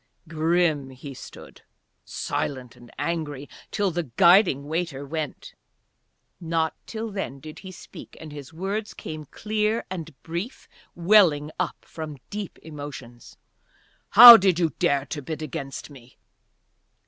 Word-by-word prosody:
Grim 160 -3 0
he 135 +2 -10
stood, - - -13 0.4
silent 130 -3 -4
and 120 -1 -16
angry, 145 -2 -3 0.2
till 200 -2 0
the 175 +1 -1
guiding 175 -6 +5
waiter 160 -3 -3
went. 155 0 -6 0.9
Not 165 -1 -1
till 225 0 -5
then 195 -9 -5
did 155 +2 -11
he 190 - -10
speak, 185 - -13
and 155 -1 -10
his 145 -2 -10
words 195 +6 -4
came 155 -1 -8
clear 215 - -2
and 160 -6 -7
brief, 175 +9 -6 0.3
welling 170 -5 +4
up - - -3
from 155 -3 -8
deep 205 -2 -6
emotions. 145 -6 -10 0.7
"How 235 +2 +12
did 190 -4 +2
you 165 -3 +1
dare 140 -1 +1
to 145 +2 -6
bid 155 +2 -6
against 135 0 -7
me?" 130 -3 -16
160 Hz, 130 wpm, -24 LUFS, 145-185 Hz, 0.9 s, How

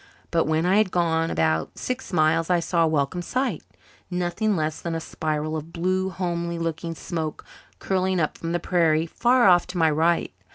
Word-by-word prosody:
But 165 -1 +2
when 160 +2 +1
I 190 +3 +3
had 215 -2 +3
gone 165 -2 +1
about 80 0 0
six 255 +1 -4
miles 160 0 +2
I 180 -1 +3
saw 170 0 +1
a - - +2
welcome 155 +3 0
sight 255 - -2 0.5
nothing 180 +4 0
less 155 -1 -2
than 170 -1 -3
a - - -1
spiral 155 -1 -3
of 155 +1 -6
blue, 185 +3 0
homely 170 -2 -3
looking 165 0 -3
smoke 160 -2 -5 0.3
curling 185 -1 0
up 155 - 0
from 165 - -5
the 175 - 0
prairie 165 -3 +2
far 240 +7 +3
off 175 -2 +5
to 180 0 -6
my 160 -2 +4
right. 165 +3 +1
170 Hz, 190 wpm, -24 LUFS, 160-180 Hz, 0.5 s, off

